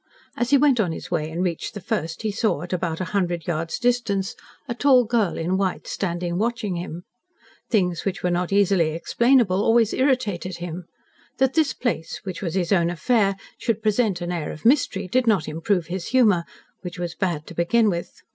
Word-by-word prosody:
As 240 - -1
he 280 - +6
went 275 -3 +4
on 185 -6 +2
his - - -8
way 155 0 -1
and 170 +3 -2
reached 175 +1 -3
the - - -4
first, 165 0 -3
he 215 - 0
saw 210 -7 0
at 175 - -6
about 170 -2 -2
a - - -1
hundred 175 -4 0
yards 165 -1 -2
distance 225 -6 0 0.3
a 240 - -2
tall 255 0 +5
girl 220 -5 +1
in 175 +3 0
white 190 -2 -1
standing 175 -1 -2
watching 220 -4 -1
him. 170 0 -6 0.7
Things 180 -7 +1
which 195 -1 -3
were 180 - +1
not 175 +1 -1
easily 195 -5 +3
explainable 230 +1 +3
always 225 -1 +3
irritated 210 - 0
him. 175 0 -6 0.5
That 265 0 +2
this 315 -4 +2
place 170 -10 -3
which 185 -3 -6
was 175 -3 -3
his 180 -1 0
own 170 -3 +3
affair 195 +3 +2 0.2
should 225 -2 -1
present 215 -4 +1
an 175 0 -3
air 170 -4 -3
of 155 - -11
mystery, 230 -7 +2
did 255 +6 +1
not 205 -7 +3
improve 165 +3 0
his 175 +2 -5
humour, 215 -9 +3 0.4
which 180 -1 -7
was 175 -1 -3
bad 170 -6 -2
to - - -10
begin 215 +7 +2
with. 175 -4 -2
190 Hz, 195 wpm, -23 LUFS, 175-225 Hz, 0.7 s, he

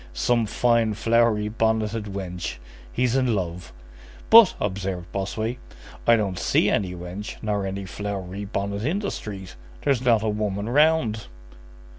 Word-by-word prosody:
"Some 115 - +1
fine, 115 -1 +2
flowery 115 -1 +2
bonneted 110 0 0
wench! 90 -4 -5 0.4
He's 125 0 +1
in 130 -4 +2
love." 85 -6 -4 0.6
"But," 225 -3 +9
observed 95 -3 -3
Bossuet, 110 +5 -3 0.5
"I 115 - +7
don't 100 -5 -1
see - - +2
any 90 -3 0
wench 90 +4 -7
nor 105 -2 -1
any 95 0 -4
flowery 100 +1 -5
bonnet 100 +1 -3
in 160 +9 0
the 205 -1 -2
street. 95 -3 -7 0.3
There's 135 -4 +2
not 115 -4 +3
a 110 - +1
woman 105 -1 -2
round." 135 -5 +2
105 Hz, 140 wpm, -24 LUFS, 95-115 Hz, 0.6 s, But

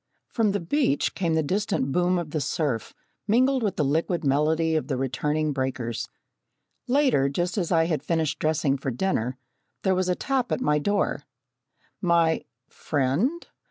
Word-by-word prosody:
From 220 -4 +1
the 200 - -1
beach 175 - +1
came 170 -4 0
the 160 - +2
distant 180 -5 -1
boom 180 +3 +2
of 170 -4 -4
the 155 - -1
surf, 135 -4 -2 0.3
mingled 255 +4 +3
with 205 -4 -1
the 150 - +1
liquid 165 +4 0
melody 155 +3 +2
of 155 - -1
the 135 - -1
returning 150 +4 -1
breakers. 130 -4 -3 0.8
Later, 255 - +3
just 175 +6 -1
as 185 -5 -1
I 165 -2 +4
had 160 -5 -1
finished 160 0 -1
dressing 155 -3 +1
for 135 - -2
dinner, 125 -3 -1 0.5
there 190 - +3
was 185 0 0
a 180 - +2
tap 265 +1 -1
at - - +1
my 150 -11 +2
door. 205 +6 0 0.8
My 170 -3 +2 0.2
friend 155 - -1
160 Hz, 160 wpm, -25 LUFS, 140-190 Hz, 0.8 s, I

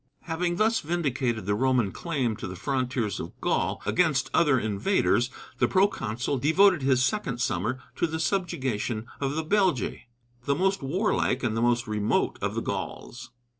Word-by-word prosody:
Having 175 +1 -1
thus 220 +4 +2
vindicated 135 - -1
the 100 - +1
Roman 125 -2 +2
claim 135 - -2
to - - -5
the 95 - -6
frontiers 125 -3 -1
of - - -8
Gaul - - 0
against 160 -6 +1
other 145 -6 +4
invaders, 120 - +1 0.3
the - - +4
proconsul 140 - 0
devoted 175 +4 +4
his 130 -1 +3
second 135 - -2
summer 105 +2 -1 0.2
to 170 - +1
the 160 0 -4
subjugation 130 - -1
of 140 0 -1
the 160 0 -2
Belgæ, 185 - +1 0.5
the 140 - +2
most 195 +4 +1
warlike 140 - 0
and 115 -2 0
the 115 - 0
most 120 0 +2
remote 105 -2 0
of - - -2
the - - -2
Gauls. 125 +1 -5
135 Hz, 160 wpm, -27 LUFS, 120-170 Hz, 0.5 s, other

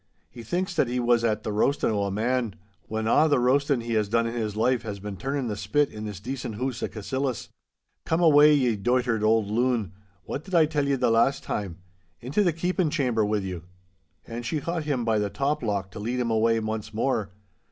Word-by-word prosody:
He 120 - -10
thinks 180 - -2
that 160 -6 +2
he 125 +1 -1
was 120 -1 +2
at 110 -2 0
the 110 - -3
roastin' 115 +5 +1
o' 100 -2 0
a - - -1
man, 115 +2 -1 0.3
whan 110 0 -2
a' 155 +7 +4
the 145 - +4
roastin' 135 +1 +2
he 115 0 -3
has 105 -2 +1
done 115 +1 +2
in 115 - -3
his 110 -3 -3
life 120 +2 +2
has 105 -3 -5
been 100 0 -6
turnin' 135 +5 -2
the 105 - -2
spit 120 +9 0
in 105 0 -7
this 105 -3 -6
decent 125 0 -5
hoose 125 +1 -3
o' - - 0
Cassillis. 125 +3 -3 0.5
Come 160 - 0
awa', 150 -2 +7
ye 135 -6 +3
doitered 120 +1 +1
auld 110 -1 +2
loon, 115 -5 0 0.3
what 140 - -5
did 190 -2 -4
I 165 -2 +6
tell 150 -2 -1
ye 140 - +2
the 125 - +1
last 115 +4 +2
time?—Into 90 - -4
the 175 - +3
keepin' 175 +1 0
chamber 125 -8 +1
wi' 105 0 0
you!' 90 -3 -6 0.6
And 115 +1 -6
she 150 +6 -2
caught 165 +1 -3
him 130 -6 -1
by 110 -2 +2
the 105 -1 -1
top 145 +6 -1
lock 100 -4 -2
to - - -8
lead 120 +4 -2
him 120 -2 0
away 115 +1 +3
once 110 -1 -4
more. 110 -3 0
115 Hz, 220 wpm, -26 LUFS, 105-135 Hz, 0.6 s, awa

